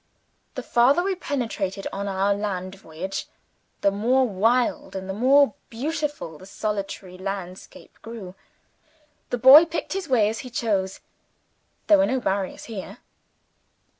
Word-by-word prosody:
The - - -4
farther 265 +8 +3
we 390 +1 0
penetrated 225 - -3
on 200 +1 -3
our 195 +1 +1
land 190 -2 -3
voyage, 190 0 -6 0.5
the 200 - +3
more 250 +6 +2
wild 230 +4 +1
and 190 0 -5
the 190 - -3
more 260 +3 +4 0.2
beautiful 290 - -4
the 185 - -13
solitary 195 -3 -4
landscape 190 +6 -7
grew. 225 -6 -8 1.0
The 245 - -1
boy 265 +7 +9
picked 330 +2 -4
his 385 -4 -4
way 230 -5 +4
as 220 +1 -3
he 255 - -8
chose 200 -6 -1 0.8
there 310 -2 +6
were 290 - +4
no 260 - 0
barriers 195 -4 -2
here. 210 -5 -8
215 Hz, 135 wpm, -24 LUFS, 195-260 Hz, 1.0 s, boy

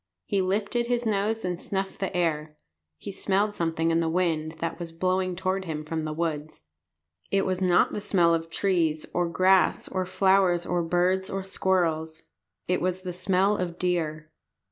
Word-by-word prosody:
He 195 - +1
lifted 210 +5 0
his 245 0 0
nose 215 0 0
and 180 -1 -3
snuffed 195 -1 -3
the 195 -1 -2
air. 155 -3 -1 0.4
He 140 - -7
smelled 200 +2 0
something 165 -2 0
in 165 - +2
the 165 -1 0
wind 160 -2 0
that 165 +1 -4
was 170 -1 -6
blowing 185 +2 0
toward 190 +1 -1
him 155 -2 -4
from 160 0 -3
the 155 - -3
woods. 155 - -3 0.7
It 195 0 +1
was 185 0 -1
not 180 -2 +3
the 210 - -3
smell 180 -5 +3
of 165 0 -1
trees 165 -4 0
or 175 -1 +1
grass 185 +2 +3
or 185 -1 -2
flowers 190 -2 +3
or 175 -1 0
birds 180 +3 +1
or 195 0 -3
squirrels. 165 -4 0 0.4
It 180 - +1
was 185 +1 -1
the 180 -1 -4
smell 190 +3 +2
of 175 -2 -3
deer. 160 -4 -2
180 Hz, 175 wpm, -26 LUFS, 165-190 Hz, 0.7 s, not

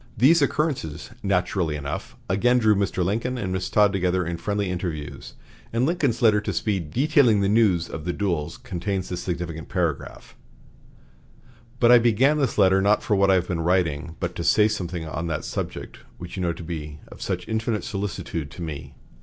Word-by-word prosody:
These 150 +8 +5
occurrences, 140 - -1
naturally 90 -4 0
enough, 75 -1 -5
again 120 +6 +3
drew 110 -3 +4
Mr. 100 -3 0
Lincoln 115 +6 -1
and 100 -6 -3
Miss 95 0 -2
Todd 105 -1 +4
together 90 -1 +1
in 85 0 -3
friendly 100 +3 -2
interviews, 85 -5 -5 0.4
and 115 +3 +1
Lincoln's 145 -8 0
letter 105 -2 +5
to - - -3
Speed 95 -8 -1
detailing 130 - +3
the 100 - +2
news 100 -6 +3
of 80 - -7
the 90 - -1
duels 85 -6 -2
contains 95 +1 -4
this 90 -1 -4
significant 85 -4 -4
paragraph: - - -3 1.4
"But 120 0 +5
I 120 - +9
began 125 +6 +3
this 135 -5 0
letter 95 -1 +5
not 105 +2 +3
for 105 - +1
what 100 0 +3
I 95 - +6
have 90 -1 0
been 85 -2 -2
writing, 85 -2 0
but 85 0 -2
to 85 - -3
say 105 +5 +4
something 90 -6 -3
on 80 +2 -4
that 80 -2 -3
subject - - -5 0.2
which 85 0 -8
you 95 - -4
know 85 -1 0
to 85 +1 -9
be 75 -2 -6
of - - -13
such - - -3
infinite 110 -1 -1
solicitude 90 -6 -4
to 85 +5 -8
me. 75 -4 -7
95 Hz, 185 wpm, -24 LUFS, 85-110 Hz, 1.4 s, I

